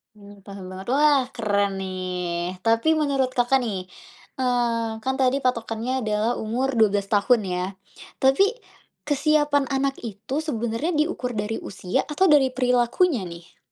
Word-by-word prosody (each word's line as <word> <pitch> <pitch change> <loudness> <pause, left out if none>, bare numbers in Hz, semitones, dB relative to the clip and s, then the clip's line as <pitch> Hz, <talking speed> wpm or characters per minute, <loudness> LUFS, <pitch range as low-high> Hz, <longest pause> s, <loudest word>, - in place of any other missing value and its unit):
Mmm, 205 -1 -15
paham 195 -2 -9
banget. 190 +3 -9
Wah 290 -2 +4
keren 205 -3 +1
nih. 180 -1 -3
Tapi 230 +7 +2
menurut, 275 -4 +1
Kakak 245 +2 +3
nih, 195 -6 -4 0.5
eee, 240 -3 0
kan 265 0 0
tadi 265 +1 +3
patokannya 235 +1 -1
adalah 215 +2 +1
umur 240 +5 -1
12 205 -2 +3
tahun 215 +3 +3
ya. 180 0 -1 0.6
Tapi 270 +9 +5 0.6
kesiapan 290 -1 +2
anak 270 0 0
itu, 225 +4 -6
sebenarnya 235 +2 -2
diukur 300 -5 -1
dari 210 +2 -2
usia 185 -1 -2
atau 320 +6 +2
dari 295 -5 +5
perilakunya 250 - +2
nih? 170 0 -12
235 Hz, 135 wpm, -24 LUFS, 205-270 Hz, 0.6 s, Tapi